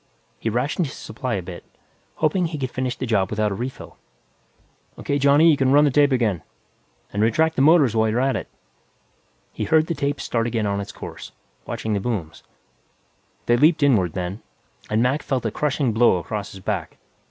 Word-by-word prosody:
He - - -2
rationed 140 - -1
his - - -9
supply 120 +2 -4
a 95 - -3
bit, 90 0 -9 0.5
hoping 170 +3 +1
he 160 -2 -5
could 130 -3 -3
finish 130 -1 -2
the 130 - -4
job 100 -5 +1
without 105 -1 0
a - - -1
refill. 125 +6 -7 1.0
"O.K., 140 0 -2
Johnny, 145 +4 +5
you - - +4
can 135 -1 +1
run 145 +1 +6
the 145 - +3
tape 145 +1 +4
again. 110 - +1 0.7
And 100 - -1
retract 160 +9 +2
the - - +1
motors 145 -6 +5
while 110 0 +2
you're 115 +3 0
at 135 +1 +1
it." - - -4 1.1
He - - -3
heard 160 -1 +3
the 170 - -2
tape 140 -2 -2
start 115 -1 -1
again 115 -2 -1
on 100 0 -1
its 100 - -7
course, - - -9 0.3
watching 110 - -3
the 100 - 0
booms. 95 -8 -4 1.0
They 120 - +3
leaped 155 +3 +4
inward, 100 - +3
then, 90 +4 -4 0.5
and 110 +2 +2
Mac 135 +4 +1
felt 130 -4 -2
a 110 - 0
crushing 140 -3 0
blow 115 -4 +4
across 100 +4 -5
his 95 - -11
back. 95 -5 -4
125 Hz, 195 wpm, -22 LUFS, 105-145 Hz, 1.1 s, run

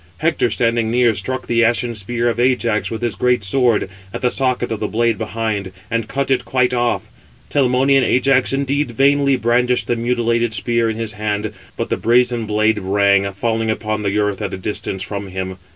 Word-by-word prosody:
Hector, 160 -6 +1
standing 115 0 0
near, 120 0 +3
struck 130 +6 -4
the 120 0 +2
ashen 120 +1 +1
spear 115 +3 -2
of 120 0 -1
Ajax 120 -3 +1
with 115 +1 -5
his 120 -3 0
great 125 +3 +1
sword, 115 +1 +2 0.2
at - - -6
the 125 - +2
socket 125 -3 0
of 110 - -2
the 105 - -2
blade 115 -1 0
behind, 110 -3 -3 0.2
and 115 -1 -1
cut 140 +1 -2
it 130 - +2
quite 125 -1 +1
off; 120 -1 0 0.4
Telamonian 135 0 +3
Ajax 130 +1 +2
indeed 140 +1 0
vainly 140 +2 +3
brandished 125 +1 +1
the 120 - 0
mutilated 120 -1 0
spear 115 0 0
in 110 - -3
his 115 -2 -2
hand; 105 0 -3 0.2
but - - -3
the - - +1
brazen 120 -1 +2
blade 110 0 +1
rang, 100 0 +2
falling 110 +3 -1
upon 110 -1 -2
the 100 0 -1
earth 105 -1 0
at 100 -2 -3
a - - -7
distance 95 0 -3
from 100 -1 -5
him. 95 0 -5
115 Hz, 190 wpm, -18 LUFS, 105-125 Hz, 0.4 s, near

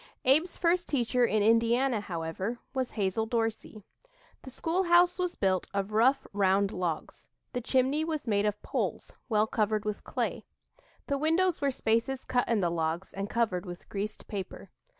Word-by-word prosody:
Abe's 310 +7 +3
first 350 +1 +1
teacher 250 -2 +2
in 215 -2 +1
Indiana, 230 +2 +3
however, 180 +5 -4 0.2
was 260 -2 -1
Hazel 210 +1 -1
Dorsey. 225 -2 -2 0.6
The - - -10
school 335 +8 -1
house 350 +1 +5
was 360 -1 -1
built 190 -2 +1
of 200 +1 -1
rough, 255 +6 +3
round 195 0 +2
logs. 175 -3 -4 0.2
The 245 - -2
chimney 265 +5 +1
was 315 -5 -3
made 205 -1 +2
of 210 0 -3
poles - - -3 0.2
well 215 -1 +3
covered 215 -1 0
with 210 -1 -3
clay. - - -2 0.6
The 280 -1 -1
windows 330 +3 +2
were 280 - +2
spaces 250 +1 0
cut 245 -1 0
in 225 -3 +2
the 175 -2 +1
logs, 165 +2 -2
and 195 +1 -4
covered 205 -6 0
with 175 0 -9
greased 205 +1 -5
paper. 195 -3 -6
225 Hz, 165 wpm, -29 LUFS, 200-270 Hz, 0.6 s, house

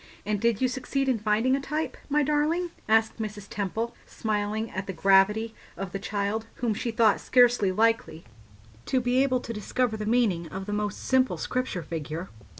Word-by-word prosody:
"And 205 -1 -1
did 230 -1 +2
you 260 - +4
succeed 260 +2 -2
in 255 -4 +2
finding 215 +5 +2
a 275 - -2
type, 300 +3 -3
my 295 +1 +3
darling?" 305 +5 +1 0.2
asked 220 0 +3
Mrs. 210 -2 -5
Temple, 220 +4 -3
smiling 215 0 -2
at 190 +1 -4
the 195 - -3
gravity 195 +5 +3 0.2
of 195 -2 -5
the 195 - -4
child, 205 +2 -2
whom 235 -3 0
she 235 +4 -3
thought 225 -2 +3
scarcely 245 -6 +4
likely 220 -6 +1 0.6
to 260 - +2
be 250 +1 +2
able 255 -2 +2
to 230 - -5
discover 220 +2 -1
the 210 0 -4
meaning 215 -8 +2
of 190 +4 -6
the 205 - -4
most 210 -1 -2
simple 260 0 +2
Scripture 250 -9 -2
figure. 160 +2 -5
220 Hz, 180 wpm, -27 LUFS, 200-250 Hz, 0.6 s, you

